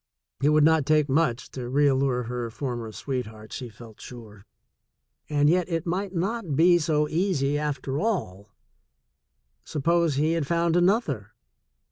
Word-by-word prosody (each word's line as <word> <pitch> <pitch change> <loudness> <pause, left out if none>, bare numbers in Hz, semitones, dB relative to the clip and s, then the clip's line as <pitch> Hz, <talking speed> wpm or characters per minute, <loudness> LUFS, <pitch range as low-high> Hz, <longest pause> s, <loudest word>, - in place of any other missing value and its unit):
It 145 - +3
would 150 0 +4
not 160 -2 +3
take 155 -1 +3
much 135 -4 0
to 125 -2 -6
reallure 135 -2 +2
her 120 0 -4
former 120 -2 -5
sweetheart, 110 -4 -6
she 125 -2 -6
felt 110 -1 -14
sure 110 -5 -12 0.4
— - - -55
and 145 -1 +2
yet 180 +2 +2
it 165 -1 -2
might 185 +3 -2
not 185 -3 -2
be 175 +3 +5
so 150 -1 +1
easy 155 -4 0
after 140 -2 -3
all. 105 - -2 1.1
Suppose 165 +1 +1
he 155 +3 +1
had 165 -4 -1
found 170 0 +1
another? 175 - +1
145 Hz, 145 wpm, -25 LUFS, 125-170 Hz, 1.1 s, be